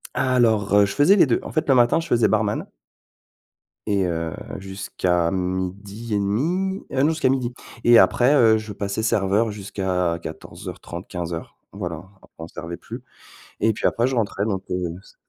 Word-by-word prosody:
Alors, 115 -6 +2
heu, 105 0 +6
je 100 - -4
faisais 150 +8 +5
les 190 - +6
2. 120 - +2
En - - -7
fait, 155 - -1
le 135 - +6
matin 120 +4 +4
je 165 - -5
faisais 120 -1 +3
barman 105 -1 0 1.2
et 100 -2 +2
heu, 85 -2 -2 0.3
jusqu'à 95 -3 -1
12:30, 100 - -2
heu, 135 - +1
non, 150 - +4
jusqu'à 155 -4 +1
12:00. 125 -2 0 0.3
Et 120 -1 +7
après, 125 +4 +5
heu, 115 -5 +5
je 110 -1 -6
passais 100 +2 -3
serveur 105 +1 +2
jusqu'à 95 -4 -2
14:30-15:00, 85 +1 -7
voilà, 90 -5 -5 0.3
on 80 - -7
servait 85 0 -7
plus. - - -9 0.6
Et 110 - +3
puis - - -5
après 120 +2 +1
je 130 - -1
rentrais 105 -3 -1
donc 95 -4 -2
heu, 90 -2 -2
s - - -20
105 Hz, 160 wpm, -23 LUFS, 90-120 Hz, 1.2 s, Et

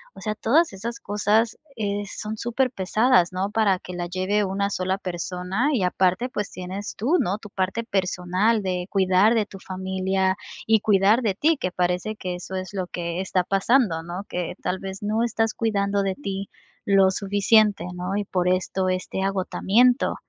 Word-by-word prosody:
O - - -11
sea, 215 -1 -2
todas 300 +9 +3
esas 230 +5 -5
cosas, 210 +2 +1 0.2
eh, 205 -2 -2
son 215 +2 -6
superpesadas, 230 -5 +2
no 190 +3 -2
para 210 -4 +2
que 180 - -9
la 175 0 -3
lleve 190 +3 0
una 200 +1 -1
sola 185 -1 -1
persona. 180 - -2
Y 220 - +1
aparte, 185 +6 +1
pues, 210 -4 -3
tienes 185 +3 -6
tú, 280 - +2
¿no?, 190 +4 0
tu 210 - -12
parte 190 +3 -2
personal 195 +1 0
de 180 -1 -2
cuidar 195 +3 +4
de 215 -2 +2
tu 195 -2 -12
familia 190 0 -1 0.3
y 220 -1 +4
cuidar 205 +3 +4
de 210 -5 0
ti, 310 +7 +2
que 185 -8 -2
parece 180 +4 -1
que 180 -3 -4
eso 180 +1 -7
es 185 +1 -5
lo 185 -2 -3
que 170 0 -4
está 185 -1 0
pasando, 195 -2 +2
¿no?, 175 +4 -6
que, 180 0 -3
tal 185 +1 -1
vez, 195 +1 -7
no 215 +2 +1
estás 225 -2 0
cuidando 200 -3 0
de 190 -1 -1
ti 195 -7 -5 0.4
lo 195 -1 +5
suficiente, 205 +1 +3
¿no?, 180 +2 -3
y 205 - 0
por 180 -2 -1
esto 185 +1 0
este 185 +1 -2
agotamiento. 200 +5 +2
195 Hz, 175 wpm, -24 LUFS, 185-215 Hz, 0.4 s, lo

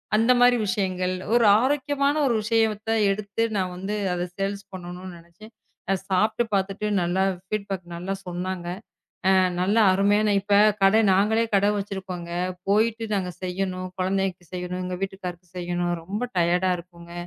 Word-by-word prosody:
அந்த 225 +3 +4
மாரி 245 0 +6
விஷயங்கள். 185 -2 -1 0.2
ஒரு 235 -1 +5 0.2
ஆரோக்கியமான 280 +1 +1
ஒரு 240 - +2
விஷயத்த 220 0 0 0.2
எடுத்து 205 +2 -2
நான் 185 -1 -1
வந்து 195 +3 -4 0.2
அதை 175 0 -2
சேல்ஸ் 200 +1 -2
பண்ணனும்னு 180 0 -8
நினைச்சேன். 170 +6 -16 0.4
அ, - - +4 0.2
சாப்பிட்டு 215 +5 +2
பாத்துட்டு 195 +1 -1 0.2
நல்லா 175 +2 +1 0.2
ஃபீட்பேக் 200 -3 -3
நல்லா 180 +3 -3
சொன்னாங்க. 180 0 -4 0.7
அ - - +5 0.3
நல்ல 200 +4 +2 0.2
அருமையான 205 +2 +3
இப்ப 200 +1 +1 0.3
கடை 205 +3 +6
நாங்களே 220 +4 +3
கடை 200 +1 +4
வச்சிருக்கோங்க. 190 -3 -5 0.4
போயிட்டு 225 +2 +2
நாங்க 185 -2 -2
செய்யணும். 185 0 -3
குழந்தைக்கு 190 -1 -1
செய்யணும். 180 0 -4
எங்க 180 0 -4
வீட்டுக்காரருக்கு 180 -2 -6
செய்யணும். 175 0 -1
ரொம்ப 200 +6 -4 0.2
டயர்ட்டா 180 +2 +2
இருக்குங்க. 170 -1 -13
190 Hz, 140 wpm, -24 LUFS, 180-210 Hz, 0.7 s, மாரி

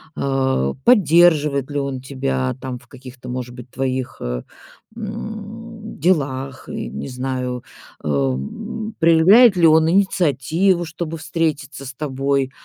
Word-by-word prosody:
а, 130 - 0
поддерживает 160 - +4
ли 145 - -2
он 140 -2 -3
тебя 65 - -2
там, 130 -2 -5
в - - -22
каких-то, 130 -2 -12
может 125 -1 -5
быть, 125 0 -11
твоих, 130 0 -2
э, - - -3 0.5
м 220 0 -7
делах 135 -5 0
и, - - -4
не 70 +2 -6
знаю, 125 -1 -3 0.4
эм 75 - -2
проявляет 180 +7 +6
ли 170 -2 +6
он 160 0 +5
инициативу, 175 -1 +2
чтобы 165 0 -5
встретиться 155 -3 -2
с 130 - -7
тобой, 135 -1 -1
140 Hz, 125 wpm, -20 LUFS, 130-175 Hz, 0.5 s, проявляет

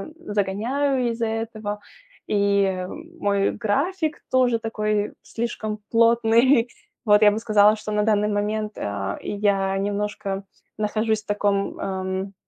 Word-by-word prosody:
э, 330 -11 -8
загоняю 240 +7 0
из-за 230 0 -2
этого. 220 -2 -4 0.5
И 200 -2 +1 0.3
мой 200 -6 +1
график 310 - -1
тоже 250 -2 +3
такой 215 -2 -1
слишком 220 -2 -4
плотный. 230 +2 +4 0.4
Вот, 210 0 +5
я 210 - +7
бы 210 - -2
сказала, 215 -1 +4
что 215 0 -6
на 210 0 +1
данный 210 -1 +2
момент, 210 +1 -1
а, 100 -1 -3
я 195 -2 0
немножко 200 -1 -2 0.3
нахожусь 215 +1 0
в - - -42
таком, 205 -1 0
ам, 190 0 -3
210 Hz, 125 wpm, -23 LUFS, 200-230 Hz, 0.5 s, я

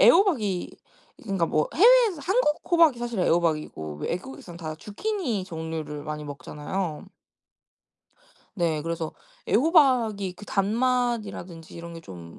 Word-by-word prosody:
애호박이 245 - +4 0.5
그러니까 195 -6 0
뭐 155 -1 +1
해외에서 450 -3 +6
한국 380 -5 +2
호박이 330 -8 +5
사실 240 -3 -3
애호박이고 155 - 0
외국에선 175 - -5
다 155 -2 -5
주키니 235 - -2
종류를 160 -4 -5
많이 150 -1 -5
먹잖아요. 150 +4 -5 1.5
네. 160 -4 0
그래서 165 -1 -3 0.4
애호박이 245 - +3
그 205 - -11
단맛이라든지 215 -5 -1
이런 170 0 -8
게 165 - -8
좀 85 - -11
190 Hz, 295 characters per minute, -26 LUFS, 160-255 Hz, 1.5 s, 해외에서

